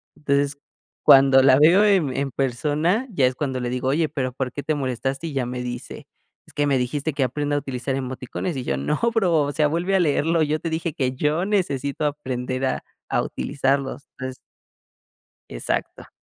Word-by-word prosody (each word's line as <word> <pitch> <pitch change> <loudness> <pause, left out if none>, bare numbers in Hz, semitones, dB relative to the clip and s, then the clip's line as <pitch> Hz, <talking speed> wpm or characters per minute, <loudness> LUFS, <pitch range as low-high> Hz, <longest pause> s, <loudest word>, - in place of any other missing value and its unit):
Entonces 140 -1 0 0.5
cuando 135 0 +7
la 130 -1 +6
veo 170 +7 +6
en 180 -11 +2
en 140 -1 -1
persona 150 - 0
ya 140 -8 +2
es 125 - -2
cuando 130 -2 -2
le 125 -1 -2
digo: 125 +1 -2
"Oye, 155 +3 +1
pero, 130 -3 -2
¿por 130 -1 -3
qué 145 - -6
te 155 - 0
molestaste?". 135 +2 -2
Y 155 - -6
ya 135 -2 0
me 125 0 -4
dice: 125 0 -7 0.4
"Es - - -19
que 145 - +1
me 140 - +2
dijiste 140 +5 -2
que 140 -1 0
aprenda 145 +3 -1
a - - +2
utilizar 135 -1 -3
emoticones", 130 +5 -4
y 130 - -3
yo 70 - -1
no 70 - -1
bro, 195 -7 +2
o 145 - -2
sea 150 0 +2
vuelve 170 +5 0
a 190 - +4
leerlo, 160 0 +2
yo 155 +1 0
te 165 - -3
dije 160 -1 -2
que 130 -2 -1
yo 150 +6 0
necesito 150 -8 -1
aprender 130 -3 -2
a 130 - -1 0.3
a - - +2
utilizarlos. 140 0 -2
Entonces 130 0 -5 1.1
Exacto. - - -4
140 Hz, 190 wpm, -23 LUFS, 130-155 Hz, 1.1 s, cuando